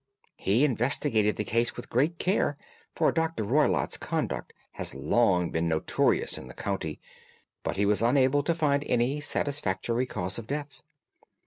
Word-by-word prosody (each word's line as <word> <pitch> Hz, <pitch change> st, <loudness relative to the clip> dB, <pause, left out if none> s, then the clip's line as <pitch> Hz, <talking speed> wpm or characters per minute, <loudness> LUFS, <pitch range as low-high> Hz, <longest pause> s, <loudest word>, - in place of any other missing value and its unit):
"He 115 Hz, +9 st, +3 dB
investigated 120 Hz, -4 st, +2 dB
the -, -, -2 dB
case 115 Hz, +2 st, 0 dB
with -, -, -8 dB
great 150 Hz, +8 st, +2 dB
care, 185 Hz, +4 st, +1 dB, 0.4 s
for -, -, +3 dB
Dr. 165 Hz, -7 st, -1 dB
Roylott's 140 Hz, +9 st, +2 dB
conduct -, -, -3 dB, 0.2 s
had -, -, -5 dB
long 90 Hz, -, +2 dB
been 80 Hz, +1 st, 0 dB
notorious 80 Hz, -1 st, +1 dB
in 65 Hz, -, -10 dB
the 60 Hz, -, -11 dB
county, 95 Hz, -6 st, -3 dB, 0.6 s
but -, -, -3 dB
he 100 Hz, -, +2 dB
was 105 Hz, +1 st, +2 dB
unable 130 Hz, +3 st, +3 dB
to 165 Hz, +3 st, 0 dB
find 145 Hz, -3 st, +1 dB
any 125 Hz, +5 st, +1 dB
satisfactory 125 Hz, -4 st, -1 dB
cause 90 Hz, -1 st, -3 dB
of 115 Hz, -, -9 dB
death. 145 Hz, +1 st, -5 dB
120 Hz, 150 wpm, -28 LUFS, 100-145 Hz, 0.6 s, He